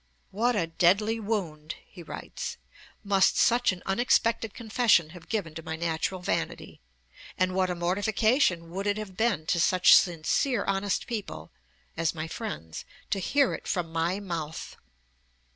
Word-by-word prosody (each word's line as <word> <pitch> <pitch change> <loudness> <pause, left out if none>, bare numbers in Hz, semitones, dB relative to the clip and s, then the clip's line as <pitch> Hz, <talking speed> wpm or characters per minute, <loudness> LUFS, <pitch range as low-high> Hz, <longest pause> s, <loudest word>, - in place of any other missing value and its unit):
'What 235 +5 +1
a 180 - +1
deadly 200 +7 +2
wound,' 175 -8 -3
he 180 - -13
writes, 165 - -6 0.5
'must 195 -2 +3
such 240 -1 +4
an 180 -1 -8
unexpected 230 +1 +1
confession 220 -8 +2
have 175 -1 -13
given 195 -8 -2
to 165 - -7
my 160 0 -5
natural 170 +3 -2
vanity, - - -3 0.6
and 185 0 +1
what 185 0 +1
a 180 - -1
mortification 190 - +1
would 195 +3 -3
it 205 +1 +1
have 210 -3 -7
been 205 -7 0
to 170 - +1
such 180 +2 +6
sincere 185 - +2
honest 195 0 -1
people 200 - -6 0.4
[as 165 0 0
my 160 0 -4
friends] 160 - -6 0.3
to 200 - +1
hear 280 +8 +2
it - - -7
from 175 -3 -2
my 170 +4 0
mouth!' 165 -5 -5
190 Hz, 150 wpm, -28 LUFS, 165-215 Hz, 0.6 s, such